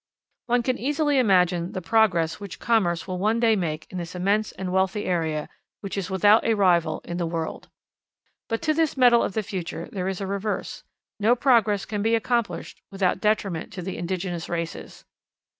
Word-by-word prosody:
One 245 0 +2
can 255 +1 -1
easily 290 +1 +1
imagine 180 -6 +2
the - - -3
progress 175 -7 +2
which 200 -2 -8
commerce 190 -8 +1
will 185 -1 -3
one 215 +4 +1
day 230 -2 +4
make 160 -5 -3
in 185 - -4
this 170 +1 -7
immense 200 +4 +1
and 185 -1 -5
wealthy 190 +2 +1
area, 160 -4 -1 0.3
which 195 - -5
is 195 -2 -3
without 205 +4 +4
a 225 - +2
rival 180 -5 +2
in 175 - -4
the 170 -2 -1
world. 165 -1 -4 0.8
But 225 - -2
to 310 -1 +2
this 320 -2 0
medal 245 -2 +6
of - - -1
the 220 - -1
future 180 -5 -5
there 185 -2 -3
is 190 -1 -3
a 195 - -3
reverse. 200 +2 -3 0.4
No 225 +4 +4
progress 225 -6 +3
can 205 -1 -3
be 225 +2 +2
accomplished 235 0 -2
without 190 -2 0
detriment 210 -3 0
to 185 -1 -6
the 190 +1 -4
indigenous 175 -1 -3
races. 170 -1 -5
195 Hz, 185 wpm, -25 LUFS, 175-225 Hz, 0.8 s, medal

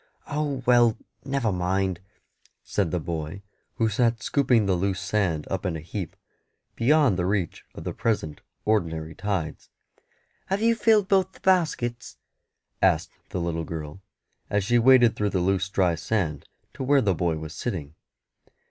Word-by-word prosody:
"Oh, 145 -3 -2
well, 120 -3 +5 0.3
never 135 -5 0
mind," 95 0 0 0.6
said 100 -5 -1
the 90 - -1
boy, 80 +4 -5 0.3
who 115 -2 +2
sat 115 +1 +1
scooping 125 -6 +3
the 95 - +2
loose 95 +1 0
sand 100 -6 0
up 95 - -3
in 90 -4 -1
a - - -6
heap, 85 +2 -6 0.6
beyond 130 - +3
the 90 - +1
reach 95 -4 -1
of - - -8
the - - -4
present 80 -10 -2 0.2
ordinary 80 -7 0
tides. 95 -5 -3 0.8
"Have 195 +1 0
you 230 0 +5
filled 220 -3 +3
both 190 -1 +2
the - - -18
baskets?" 155 -11 0 0.6
asked - - +2 0.2
the - - -3
little 85 -1 -2
girl, 80 +3 -7 0.5
as 100 -1 +1
she 120 +4 +3
waded 120 -1 +6
through 105 0 0
the 95 - -1
loose 95 +1 +1
dry 95 -3 +2
sand 80 -4 -2 0.2
to - - -9
where 140 +1 +4
the 100 -5 +2
boy 85 -2 0
was 80 0 -7
sitting. 80 -11 -4
100 Hz, 155 wpm, -25 LUFS, 85-120 Hz, 0.8 s, waded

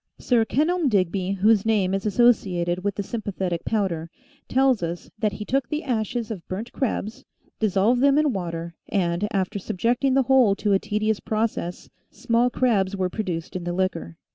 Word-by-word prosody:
Sir 235 -3 +2
Kenelm 310 +5 +1
Digby, 190 -2 0
whose 205 +1 +3
name 205 -4 +1
is 195 +2 -1
associated 185 -6 +2
with 200 -1 -1
the 200 - -3
Sympathetic 190 -5 -3
Powder, 180 -7 -1 0.4
tells 265 -4 +3
us 170 +1 -5
that 210 -2 0
he 210 - -6
took 265 +1 0
the 305 +1 -2
ashes 230 -3 -2
of 190 -6 -7
burnt 210 +6 -5
crabs, 225 -4 -3 0.4
dissolved 215 +4 +2
them 280 +1 +4
in 300 -3 +2
water 170 -3 -4 0.2
and, 180 0 0
after 200 0 -1
subjecting 240 +8 0
the 270 - +4
whole 255 -6 +4
to 205 0 0
a 195 - +4
tedious 215 +1 -1
process, 215 -5 -2 0.2
small 240 0 +1
crabs 205 -6 +1
were 185 -2 -1
produced 180 -7 -4
in 180 - -3
the 175 0 -3
liquor. 175 - -2
210 Hz, 170 wpm, -24 LUFS, 185-235 Hz, 0.4 s, them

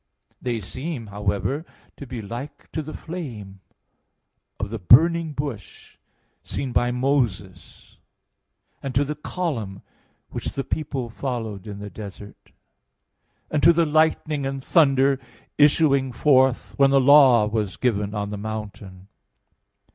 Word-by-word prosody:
They 120 -2 -2
seem, 130 - -5
however, 105 +7 -2 0.3
to 140 - -9
be 120 -3 -6
like 120 +7 -8
to 160 - -3
the 155 +1 -8
flame 115 - -7 1.0
of 100 0 -4
the 115 - -4
burning 160 - +5
bush 140 -8 -7 0.5
seen 135 -2 -4
by 120 0 +2
Moses 120 -8 -2 0.8
and 135 -2 -5
to 140 - +4
the 150 - -3
column 140 - -4 0.5
which - - -5
the 135 - -3
people 135 -6 -4
followed 110 -6 -5
in 100 -1 -7
the 100 0 -8
desert, 105 -1 -11 1.0
and 150 - +1
to 170 - +7
the 170 0 +3
lightning 155 -1 +1
and 135 -1 -5
thunder 135 -4 +3 0.4
issuing 145 -3 +4
forth 130 -1 +3
when 140 -1 +5
the 135 0 +4
law 130 -4 +7
was 105 -5 -2
given 105 0 -1
on 105 0 -3
the 105 - -5
mountain. 100 -3 -7
125 Hz, 130 wpm, -23 LUFS, 105-145 Hz, 1.0 s, to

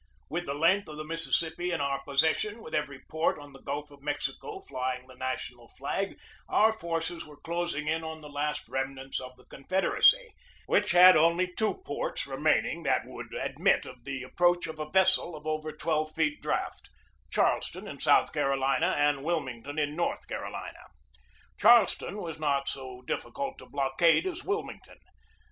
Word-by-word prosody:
With 175 +3 -3
the 140 - -2
length 170 +6 +3
of 150 - -8
the 155 - -4
Mississippi 165 +1 -1
in 165 - -1
our 140 -1 -1
possession, 160 +11 +1
with 155 - -10
every 140 -3 -2
port 160 +1 0
on 145 -1 -12
the 135 - -14
Gulf 145 +1 -4
of 140 -1 -16
Mexico 150 - -3
flying 130 - -4
the 130 - -15
national 125 -2 -5
flag, 195 +11 -3 0.3
our 220 +1 +4
forces 170 -3 -3
were 150 -1 -14
closing 170 -2 -2
in 160 +1 0
on 160 0 -6
the 150 - -10
last 150 -1 -2
remnants 135 +1 -3
of 130 0 -9
the 125 - -20
Confed 185 +8 -2
eracy, - - +5 0.4
which - - +2
had 180 +1 +9
only 170 +3 +3
two 220 - -1
ports - - -2
remaining - - +1
that - - +1
would - - -9
admit - - +1
of 125 -2 -11
the 135 0 -4
approach 175 +6 +2
of 160 -1 -7
a 155 0 -4
vessel 190 -2 +3
of 150 0 -11
over 155 0 -2
twelve 155 0 -1
feet 155 -2 0
draught, - - -3 0.4
Charleston - - 0
in - - -8
South - - +4
Carolina 135 0 +1
and 145 -1 +2
Wilmington 145 -4 -3
in 150 -1 0
North 170 - -2
Carolina. - - -6 0.7
Charleston 210 -3 +5
was 165 -6 -6
not 140 -2 +1
so 130 -2 -6
difficult 275 - -4
to - - -13
blockade 140 - +3
as 370 0 -4
Wilmington. 410 +2 -4
155 Hz, 170 wpm, -29 LUFS, 140-175 Hz, 0.7 s, had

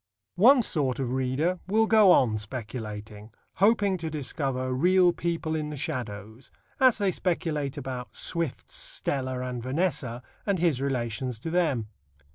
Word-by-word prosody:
One 250 +4 +7
sort 140 - 0
of 130 -3 -2
readers 130 +8 0
will 220 +3 +3
go 215 -4 +6
on 120 -9 +4
speculating, 105 -2 -7 0.3
hoping 200 -1 +3
to 165 -1 -3
discover 135 -3 -2
real 180 +5 +4
people 165 -2 -2
in 155 -1 -2
the 150 - -6
shadows, 115 -5 -5 0.3
as 260 -3 +5
they 200 -3 +1
speculate 155 -6 -2
about 130 -3 -6
Swift's 170 - -3
Stella 140 - -2
and 125 -1 -4
Vanessa, 130 -3 -1 0.2
and 200 -2 0
his 165 -7 +1
relations 125 -2 -2
to 165 - -4
them. 155 -10 +1
145 Hz, 140 wpm, -27 LUFS, 125-180 Hz, 0.3 s, One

